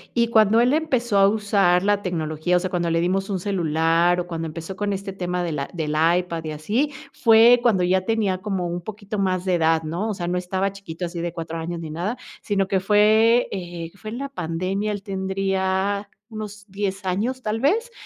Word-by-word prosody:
Y 235 -1 +2
cuando 220 0 +5
él 245 +4 +4
empezó 245 -10 +1
a 195 - +6
usar 200 -4 +2
la 205 0 +2
tecnología, 165 -1 -1
o - - +2
sea, 185 0 -4
cuando 175 -2 0
le 165 0 +1
dimos 195 +3 0
un 190 -2 -1
celular 170 -2 +2
o 175 - -2
cuando 165 -2 -4
empezó 165 +4 -7
con 205 +1 -1
este 195 0 -5
tema 180 -1 -2
de 170 - -2
la 140 -2 -3
del 160 -4 -3 0.3
iPad 170 -2 -3
y 155 - -3
así, 220 - -1 0.2
fue 230 +1 +6
cuando 215 -7 +3
ya 185 +1 +2
tenía 205 -4 0
como 190 -3 -2
un 175 +1 -4
poquito 205 +1 -6
más 185 -1 0
de 185 - +1
edad, 160 -1 +2
¿no? 170 +8 -3
O 210 - -2
sea, 175 -3 -4
no 180 +1 0
estaba 190 +2 -1
chiquito, 185 -3 -7
así 170 0 -5
de 170 0 -3
4 165 -1 -5
años 170 +1 -4
ni 160 -2 -6
nada, 180 +10 -3 0.2
sino 195 -3 0
que 195 -1 +1
fue, 215 +4 +4
eh, 175 -3 -6
fue 215 +1 -8
en 235 - -5
la 275 +1 -4
pandemia. 190 -1 -2
Él 200 -1 -6
tendría 195 +1 -1 0.2
unos 210 -2 -8
10 195 0 -3
años, 220 +8 -1
tal 215 +1 -1
vez. 445 - +1
190 Hz, 215 wpm, -23 LUFS, 175-210 Hz, 0.3 s, a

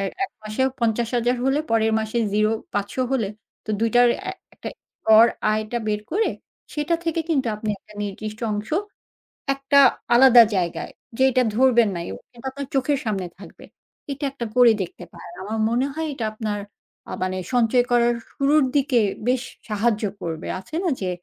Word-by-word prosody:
এই 195 - -1 0.2
এক - - -8
মাসেও 215 +5 0
৫০,০০০ 235 +2 +1
হলে 270 +3 +2
পরের 225 -1 +2
মাসে 220 +2 -2
০, 215 +1 +2 0.2
৫০০ 205 +3 -2 0.2
হলে 225 -7 +1 0.4
তো 215 - -5
২ 230 - +3
টার 245 0 +6
অ্যা 380 - -4 0.2
একটা - - -7 0.4
গর 220 +1 +8 0.3
আয়টা 215 +2 -2
বের 210 0 0
করে 425 +6 +1 0.5
সেটা 300 +3 0
থেকে 330 0 0
কিন্তু 270 -5 +1
আপনি 215 0 -5
একটা 210 - -19
নির্দিষ্ট 215 +2 -6
অংশ, 210 +1 -4 0.8
একটা 275 +1 +3 0.3
আলাদা 245 -1 +8
জায়গায় 175 -2 -2 0.3
যে 260 - +3
এটা 255 +1 +3
ধরবেন 240 -3 +4
না, - - -3
ও - - -6 0.3
আপনার 280 +1 -6
চোখের 275 +1 +1
সামনে 195 -4 -2
থাকবে। 190 -4 -13 0.5
এটা 280 +2 -6
একটা 240 -4 -5
করে 245 -2 +7
দেখতে 180 - -6
পারেন। - - -11
আমার 220 +3 -4
মনে 245 +3 +1
হয় 320 0 -3
এটা 235 -4 -3
আপনার 215 -2 -3 0.5
আ - - -6
মানে 185 0 -2 0.2
সঞ্চয় 245 +1 +3
করার 240 0 +3 0.2
শুরুর 285 +1 +3
দিকে 270 -4 +3 0.3
বেশ 250 0 +2 0.3
সাহায্য 215 +1 0 0.2
করবে। 165 -1 -5
আছে 190 - -10
না 355 - +1
যে, 185 - -1
235 Hz, 170 wpm, -23 LUFS, 215-265 Hz, 0.8 s, গর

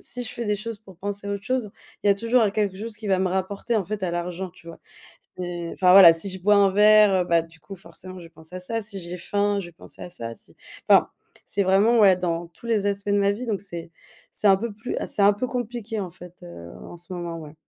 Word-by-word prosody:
si 245 0 -5
je 220 - -4
fais 235 - -4
des 210 -1 0
choses 220 0 -6
pour 190 -5 -16
penser 200 +1 -5
à - - -2
autre 200 0 -4
chose, 250 -4 -2 0.3
il - - +2
y - - +7
a 200 - +5
toujours 230 +3 +2
un 210 - +2
quelque 200 -2 -1
chose 215 +1 -6
qui 215 -1 -9
va 190 -1 +2
me 190 - +1
rapporter, 195 +5 -2
en 200 - 0
fait, 210 +1 -5
à 185 - -1
l'argent, 175 +2 -4
tu 175 -1 -20
vois? 170 - -11 0.6
C'est 175 -2 -5
enfin, 180 -1 +4
voilà, 185 -4 +10
si 165 +5 -3
je 190 0 -5
bois 205 +1 +4
un 200 -1 +5
verre, 210 0 +6
heu, 185 -1 +2
bah, 170 -1 +3
du 165 0 -17
coup, 195 - -10
forcément, 185 0 -12
je 175 - -11
vais 165 - -12
penser 160 +3 -12
à - - -6
ça. 225 +5 -3
Si 200 -2 -6
j'ai 175 +1 -7
faim, 205 +3 0
je 185 - -7
vais - - -15
penser 170 - -14
à - - -8
ça, 115 -9 -7
si - - -15 0.3
enfin, - - +6 0.4
c'est, 200 - 0
vraiment, 205 +5 +4
ouais, 195 -3 +6
dans 170 -1 -3
tous 205 - -15
les 220 -3 +1
aspects 200 0 -2
de 205 - +3
ma 200 0 +3
vie 240 +4 -6
donc 210 -4 -2
c'est 170 -4 -8 0.4
c'est 210 - +1
un 195 - +6
peu 225 +2 -4
plus 225 +4 -6
ah, - - -3
c'est 205 - -1
un 200 +1 +6
peu 220 +5 -3
compliqué, 235 -2 -4
en 185 -3 -5
fait, 180 0 -14
heu, 85 0 -10
en 175 - -10
ce 175 +2 -7
moment, 170 -2 -5
ouais. 150 0 -11
195 Hz, 280 wpm, -24 LUFS, 175-210 Hz, 0.6 s, voilà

